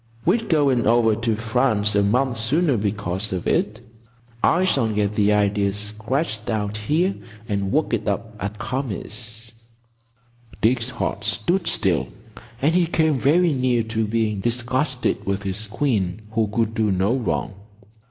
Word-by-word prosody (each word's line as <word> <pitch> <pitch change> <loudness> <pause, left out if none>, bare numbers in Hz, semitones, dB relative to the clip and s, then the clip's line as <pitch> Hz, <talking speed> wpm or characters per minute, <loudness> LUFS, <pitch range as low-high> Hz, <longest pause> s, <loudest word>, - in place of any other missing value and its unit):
"We're 205 +7 +3
going 140 - +2
over 115 -1 +4
to 115 +1 0
France 110 -2 +1
a 100 - +4
month 125 +5 +1
sooner 140 +7 +2
because 100 -1 -2
of 90 -2 -3
it. 105 +3 0 0.6
I 180 +2 +3
shall 135 -10 +2
get 105 -1 0
the 105 0 +3
idea 100 -1 +2
sketched 110 +3 -2
out 105 -2 -1
here 155 - +1 0.3
and 100 -3 -1
work 155 -4 +1
it 110 -2 -1
up 110 +2 -2
at 100 +2 -4
Kami's. 115 -2 -5 1.1
Dick's 120 +1 +2
heart 125 - -3
stood 170 - 0
still, 95 -6 +1 0.6
and 155 +3 +4
he 175 -1 +3
came 160 -4 +2
very 165 +5 +3
near 125 -3 +1
to 110 -1 0
being 110 -2 0
disgusted 125 +4 -1
with 100 0 -1
his 100 +3 -3
queen 105 -6 -1
who 110 -1 +1
could 110 +1 -1
do 110 -2 +1
no 95 +6 +1
wrong. 120 -4 -2
110 Hz, 150 wpm, -22 LUFS, 105-130 Hz, 1.1 s, over